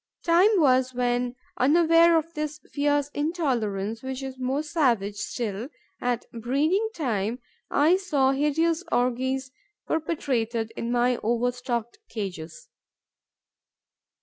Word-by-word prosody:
Time 350 Hz, +4 st, +5 dB
was 260 Hz, -3 st, +3 dB
when, 245 Hz, 0 st, 0 dB, 0.2 s
unaware 330 Hz, +4 st, +5 dB
of 325 Hz, +1 st, -2 dB
this 300 Hz, -1 st, -4 dB
fierce 290 Hz, 0 st, +1 dB
intolerance, 235 Hz, -, -1 dB
which 265 Hz, 0 st, -5 dB
is 265 Hz, -1 st, -7 dB
more 265 Hz, +4 st, -1 dB
savage 235 Hz, -, +1 dB
still 215 Hz, +1 st, -3 dB, 0.3 s
at 245 Hz, -2 st, -1 dB
breeding 290 Hz, -, 0 dB
time, 230 Hz, -, -1 dB, 0.3 s
I 315 Hz, +6 st, +4 dB
saw 290 Hz, -9 st, +1 dB
hideous 315 Hz, +5 st, +1 dB
orgies 260 Hz, +2 st, 0 dB, 0.3 s
perpetrated 240 Hz, -8 st, -1 dB
in 235 Hz, -, -3 dB
my 245 Hz, 0 st, +2 dB
overstocked 240 Hz, -, -2 dB
cages. 195 Hz, -, -6 dB
260 Hz, 105 wpm, -26 LUFS, 235-305 Hz, 0.3 s, Time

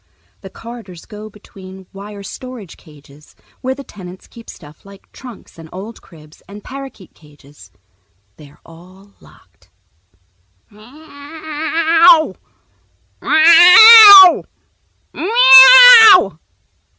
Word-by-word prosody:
The 190 Hz, -, -18 dB
corridors 225 Hz, -6 st, -19 dB
go 215 Hz, 0 st, -18 dB
between 190 Hz, -2 st, -21 dB
wire 200 Hz, +1 st, -17 dB
storage 240 Hz, -2 st, -17 dB
cages, 150 Hz, -2 st, -27 dB, 0.3 s
where 260 Hz, +1 st, -10 dB
the 280 Hz, -, -17 dB
tenants 185 Hz, -6 st, -19 dB
keep 230 Hz, -1 st, -22 dB
stuff 150 Hz, -1 st, -22 dB
like 200 Hz, 0 st, -24 dB
trunks 245 Hz, -9 st, -21 dB
and 160 Hz, -1 st, -19 dB
old 205 Hz, +5 st, -17 dB
cribs 155 Hz, -3 st, -26 dB
and 205 Hz, +1 st, -19 dB
parakeet 270 Hz, -8 st, -18 dB
cages. 145 Hz, -7 st, -26 dB, 0.7 s
They're 145 Hz, -1 st, -24 dB
all 185 Hz, +4 st, -25 dB
locked. -, -, -30 dB, 1.0 s
"Me 210 Hz, -, -27 dB
ow, 315 Hz, -, -6 dB, 0.9 s
meow, 370 Hz, +4 st, +2 dB, 0.7 s
me -, -, -15 dB
ow!" -, -, +2 dB
220 Hz, 100 wpm, -9 LUFS, -, 1.0 s, meow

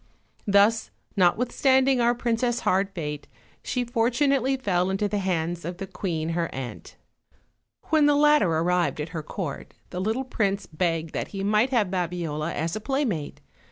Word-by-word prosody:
Thus, 205 Hz, +3 st, +4 dB, 0.3 s
not 180 Hz, -3 st, +4 dB
withstanding 260 Hz, +1 st, +3 dB
our 240 Hz, +1 st, +3 dB
princess' 240 Hz, 0 st, 0 dB
hard 195 Hz, +1 st, +2 dB
fate, 150 Hz, -4 st, -5 dB, 0.4 s
she 250 Hz, -, -1 dB
fortunately 255 Hz, +3 st, +1 dB
fell 185 Hz, -7 st, 0 dB
into 195 Hz, +2 st, 0 dB
the 205 Hz, 0 st, -1 dB
hands 175 Hz, -2 st, -1 dB
of 175 Hz, +2 st, -5 dB
the 195 Hz, -, -5 dB
queen 170 Hz, -4 st, -3 dB
her 165 Hz, 0 st, -1 dB
aunt. 130 Hz, -2 st, -7 dB, 1.0 s
When 310 Hz, -2 st, +5 dB
the 295 Hz, -, +4 dB
latter 295 Hz, -, +5 dB
arrived 170 Hz, +1 st, +1 dB
at 150 Hz, +2 st, -3 dB
her 165 Hz, -1 st, -4 dB
court 155 Hz, -2 st, -6 dB, 0.2 s
the 180 Hz, -, -3 dB
little 225 Hz, +7 st, -1 dB
prince 200 Hz, -5 st, -1 dB
begged 165 Hz, -1 st, -2 dB
that -, -, -2 dB
he 195 Hz, -1 st, -5 dB
might 210 Hz, +5 st, +3 dB
have 220 Hz, -8 st, +1 dB
Babiola 170 Hz, -4 st, -2 dB
as 165 Hz, +2 st, -2 dB
a 215 Hz, -, -4 dB
playmate. 235 Hz, -, -2 dB
195 Hz, 160 wpm, -25 LUFS, 170-240 Hz, 1.0 s, When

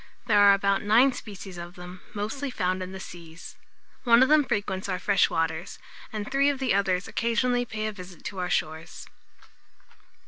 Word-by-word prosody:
There 210 Hz, -3 st, +4 dB
are 200 Hz, -1 st, +8 dB
about 200 Hz, 0 st, +1 dB
nine 235 Hz, +6 st, +4 dB
species 195 Hz, -5 st, -9 dB
of 175 Hz, +1 st, -8 dB
them, 180 Hz, 0 st, -10 dB
mostly 245 Hz, +8 st, -3 dB
found 185 Hz, -6 st, -1 dB
in 185 Hz, 0 st, -5 dB
the 190 Hz, -, -7 dB
seas. 170 Hz, -2 st, -11 dB, 0.5 s
One 235 Hz, -1 st, +6 dB
of 260 Hz, -, +2 dB
them 305 Hz, -1 st, +6 dB
frequents 200 Hz, -6 st, -2 dB
our 185 Hz, -, -1 dB
fresh 195 Hz, 0 st, +2 dB
waters, 165 Hz, +2 st, -2 dB, 0.3 s
and 215 Hz, -1 st, -4 dB
three 275 Hz, +1 st, +3 dB
of 285 Hz, -, -1 dB
the 260 Hz, -4 st, 0 dB
others 190 Hz, -2 st, +1 dB
occasionally 245 Hz, +1 st, 0 dB
pay 215 Hz, -2 st, -4 dB
a 215 Hz, -, -1 dB
visit 180 Hz, -4 st, -12 dB
to 195 Hz, -, -6 dB
our 180 Hz, -1 st, -2 dB
shores. 160 Hz, 0 st, -3 dB
200 Hz, 180 wpm, -26 LUFS, 180-235 Hz, 0.5 s, are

